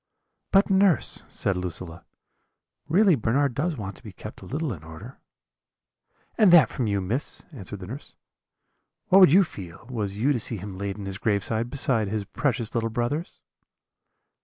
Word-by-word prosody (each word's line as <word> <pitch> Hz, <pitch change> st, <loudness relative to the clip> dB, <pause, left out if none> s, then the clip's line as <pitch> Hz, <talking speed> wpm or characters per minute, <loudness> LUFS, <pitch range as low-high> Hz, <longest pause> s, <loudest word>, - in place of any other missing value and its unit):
"'But, 195 Hz, +1 st, +4 dB
nurse,' 190 Hz, -, +3 dB
said 95 Hz, -, +1 dB
Lucilla, 85 Hz, -1 st, -5 dB, 0.8 s
'really 190 Hz, +3 st, +5 dB
Bernard 135 Hz, +2 st, +1 dB
does 155 Hz, +4 st, -1 dB
want 100 Hz, -3 st, -6 dB
to -, -, -18 dB
be -, -, -9 dB
kept -, -, -10 dB
a -, -, -11 dB
little 150 Hz, -1 st, -2 dB
in 80 Hz, -5 st, -11 dB
order.' 80 Hz, -, -11 dB, 1.2 s
"'And 210 Hz, -5 st, +6 dB
that 170 Hz, -4 st, +7 dB
from 125 Hz, -, -2 dB
you, 100 Hz, -1 st, 0 dB
Miss?' 115 Hz, +10 st, -3 dB
answered 100 Hz, -, -8 dB
the -, -, -6 dB
nurse; 130 Hz, +10 st, -9 dB, 0.9 s
'what 190 Hz, -, +7 dB
would 185 Hz, -7 st, +8 dB
you 195 Hz, +4 st, +7 dB
feel, 95 Hz, -, -10 dB
was 105 Hz, -5 st, -3 dB
you 135 Hz, +7 st, +2 dB
to 125 Hz, -, -1 dB
see 115 Hz, +1 st, 0 dB
him 100 Hz, 0 st, -7 dB
laid 100 Hz, +1 st, -4 dB
in 100 Hz, -, -7 dB
his 95 Hz, 0 st, -6 dB
grave 100 Hz, -3 st, 0 dB, 0.2 s
beside 125 Hz, -6 st, 0 dB
his 105 Hz, +1 st, -2 dB
precious 120 Hz, -2 st, -2 dB
little 115 Hz, -1 st, 0 dB
brothers?' 120 Hz, +9 st, -3 dB
115 Hz, 170 wpm, -25 LUFS, 100-145 Hz, 1.2 s, would